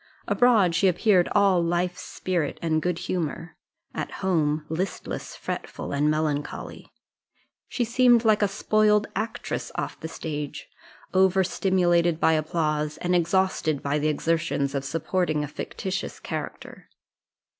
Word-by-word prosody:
Abroad 220 -8 +4
she 195 - +3
appeared 180 0 +3
all 195 -3 +4
life, 175 +1 0
spirit, 180 -4 -3
and 155 -1 0
good 175 0 -1
humour 175 -2 -4 0.4
at - - -3 0.2
home, 155 -4 +1
listless, 175 +4 -4
fretful, - - -5
and 145 +1 +2
melancholy; 155 -1 -3 0.8
she 245 - -1
seemed 240 0 +4
like 215 -1 +4
a 205 - +4
spoiled 210 +1 +2
actress 220 +3 -3
off - - -4
the - - -5
stage, 150 -3 -5 0.5
over 190 0 +4
stimulated 175 -3 +2
by 160 - +4
applause, 155 -1 -1
and 180 0 0
exhausted 170 -4 +1
by 145 +1 0
the 150 - 0
exertions 155 -2 0
of 140 -1 -2
supporting 160 +1 -1
a - - -3
fictitious 190 +6 -5
character. - - -7
175 Hz, 130 wpm, -25 LUFS, 155-190 Hz, 0.8 s, Abroad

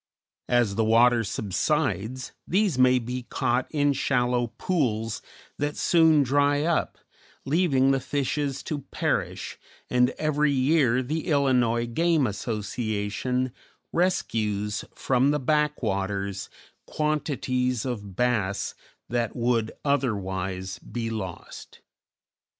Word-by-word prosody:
As 120 -4 +3
the 110 - +1
water 115 +1 +4
subsides 125 - -1 0.2
these 195 -3 +2
may 130 0 +6
be 125 +1 -3
caught 125 +2 0
in 145 -2 +2
shallow 125 -2 +1
pools 115 - -1 0.4
that 145 0 -2
soon 160 -3 +5
dry 145 +2 +2
up, 170 0 0 0.5
leaving 135 -4 +3
the 135 - +2
fishes 140 +1 -2
to 150 - -3
perish, - - -2 0.3
and 125 0 +4
every 150 -1 +1
year 130 -2 +3
the 155 +7 -3
Illinois 125 -6 +2
game 160 +4 +2
association 110 +3 -2 0.4
rescues 105 - 0
from 130 +1 +2
the 150 0 +1
"back 150 +1 +1
waters" 100 -2 -2 0.4
quantities 130 -5 -1
of 105 -7 -5
bass 110 -4 0 0.3
that 120 -1 -1
would 115 -2 +1
otherwise 95 -8 -1
be 115 +3 -4
lost. 95 -6 -7
125 Hz, 105 wpm, -26 LUFS, 110-145 Hz, 0.5 s, may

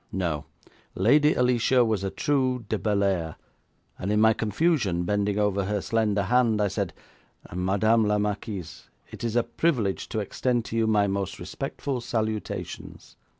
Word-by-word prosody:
No; 85 -6 -2 0.5
Lady 145 +10 +4
Alicia 125 0 +3
was 110 -4 0
a 95 - -1
true 130 -1 0
de 110 - -1
Bellairs, 100 -5 0 0.6
and 95 - -2
in 105 - +2
my 110 +1 +6
confusion, 110 - 0
bending 100 +2 0
over 100 -2 +1
her 105 +1 -1
slender 105 -1 0
hand, 115 0 +2
I 105 -1 +2
said: 100 -2 -2 0.6
'Madame 100 +5 +2
la 105 0 +2
Marquise, 105 -3 -4 0.2
it - - -9
is 115 -1 -2
a 120 - +3
privilege 120 - -1
to 115 - -4
extend 120 +3 -1
to - - -6
you 115 -1 +2
my 105 -2 +3
most 100 -1 -2
respectful 135 -4 -4
salutations.' 110 -2 -4
105 Hz, 150 wpm, -26 LUFS, 100-120 Hz, 0.6 s, my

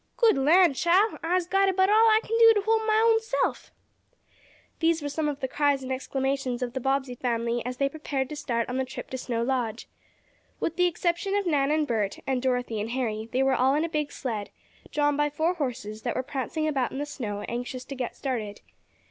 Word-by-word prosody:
"Good 465 -3 +5
lan' 320 +4 +5
chile! 365 +9 +2
I'se 350 +2 +1
got 390 +2 +2
about 380 +1 +3
all 445 +2 +6
I 435 0 +5
kin 455 - -2
do 455 0 +8
to 415 - +2
hold 440 +1 +1
mah 435 +1 +4
own 455 -1 +5
self!" 450 - -2 1.1
These 330 -2 +2
were 290 - -2
some 300 +1 -1
of 285 -1 -5
the 265 - -1
cries 285 0 +1
and 260 - -5
exclamations 265 -1 -2
as 245 - -3
the 260 - -3
Bobbsey 270 0 0
family 235 -1 -1
prepared 275 +2 -2
to 300 - -5
start 235 -5 -2
on 250 - -3
the 265 - +1
trip - - -8
to 260 - -3
Snow 235 -2 -2
Lodge. 240 -3 -2 0.7
With 330 - -2
the 360 0 +3
exception 350 +3 -1
of 405 -1 0
Nan 285 -5 +2
and 305 0 +2
Bert, 215 -7 -1
and 260 -2 0
Dorothy 245 -4 -1
and 220 - -4
Harry, 225 -3 -2
they 260 +1 +2
were 270 0 +3
all 260 +2 +3
in 310 +2 +1
a - - -4
big 300 -2 -2
sled, 215 -6 -4 0.4
drawn 290 -1 +2
by 295 0 +1
four 315 +4 0
horses 235 - -4
that - - -2
were 255 - -1
prancing 290 +4 -3
about 270 -5 0
in - - -6
the 290 - -2
snow, 210 -8 -5
anxious 245 +3 -5
to - - -7
get 255 -3 -4
started. 225 -7 -4
275 Hz, 215 wpm, -27 LUFS, 250-335 Hz, 1.1 s, do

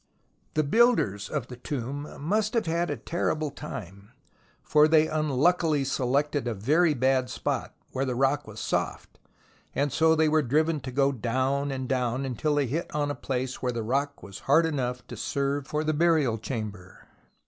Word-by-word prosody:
The 155 - +3
builders 145 - +3
of 150 -6 -2
the 125 - -9
tomb 140 +3 -4
must 210 - 0
have 230 - +2
had 170 +1 0
a - - -2
terrible 155 -3 -1
time, 100 - -8 0.5
for 150 0 +5
they 155 0 +5
unluckily 155 +1 +2
selected 135 +1 0
a 120 - -1
very 150 - +3
bad 130 0 +2
spot, - - -3 0.2
where 130 - -1
the 130 -2 -1
rock 135 +2 +1
was 110 0 -9
soft, - - -3 0.6
and 140 -1 0
so 160 0 +4
they 160 0 +3
were 155 0 +3
driven 155 +4 +1
to 130 -1 -7
go 135 +2 +2
down 130 +3 0
and 130 -1 -3
down, 125 0 0
until 135 +4 -1
they 145 -1 +2
hit 155 +8 -3
on 145 -1 0
a - - -1
place 130 -2 -3
where 125 - 0
the 115 -2 -3
rock 140 +3 -1
was 95 +1 -9
hard 160 +4 +6
enough 125 -6 -2
to - - -8
serve 140 0 -2
for 150 +1 -1
the 155 0 0
burial 155 -8 +2
chamber. 105 -5 -6
140 Hz, 180 wpm, -27 LUFS, 125-155 Hz, 0.6 s, hard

